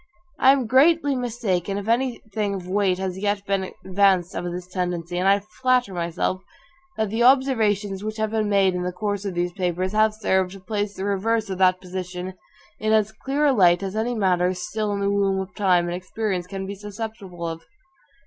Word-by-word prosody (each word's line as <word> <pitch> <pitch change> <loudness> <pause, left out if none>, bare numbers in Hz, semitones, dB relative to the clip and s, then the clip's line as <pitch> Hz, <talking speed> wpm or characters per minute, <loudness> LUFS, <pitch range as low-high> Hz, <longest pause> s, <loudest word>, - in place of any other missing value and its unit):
I 265 - +7
am 270 -3 +2
greatly 285 +4 +4
mistaken, 220 -7 -1
if 205 +1 -5
any 245 +1 0
thing 205 -2 -1
of 180 -2 -7
weight 190 -1 +1
has 190 0 -3
yet 205 0 -1
been 195 -1 -1
advanced 190 -2 +3
of - - -4
this 175 0 -4
tendency; 180 -2 -3
and 185 - +1
I 200 +1 +4 0.2
flatter 255 -5 +2
myself, 175 +2 -2 0.6
that 220 -2 -1
the 225 +2 -1
observations 220 -7 +3
which 215 +1 -4
have 220 0 -1
been 215 -2 0
made 195 -2 +3
in 180 - -2
the 180 0 -2
course 205 +1 -3
of 195 -3 -3
these 175 0 0
papers 185 0 -1
have 215 0 +3
served 190 -3 +1
to 195 - -10
place 205 +1 -3
the 190 - -4
reverse 210 +2 0
of 190 - -4
that 185 -1 +4
position 180 0 -5 0.5
in 215 0 +1
as 215 -1 +3
clear 270 +7 -1
a 285 - +4
light 175 -5 +4
as 195 +1 -4
any 235 +3 -1
matter 185 -3 +2
still 210 +4 -3
in 200 0 -2
the 200 0 +1
womb 195 -1 +1
of 190 -1 -5
time 180 -4 +2
and 175 - -3
experience 185 0 -3
can 195 +1 -5
be 195 - -5
susceptible 205 -3 -7
of. 165 0 -5
200 Hz, 205 wpm, -23 LUFS, 185-220 Hz, 0.6 s, I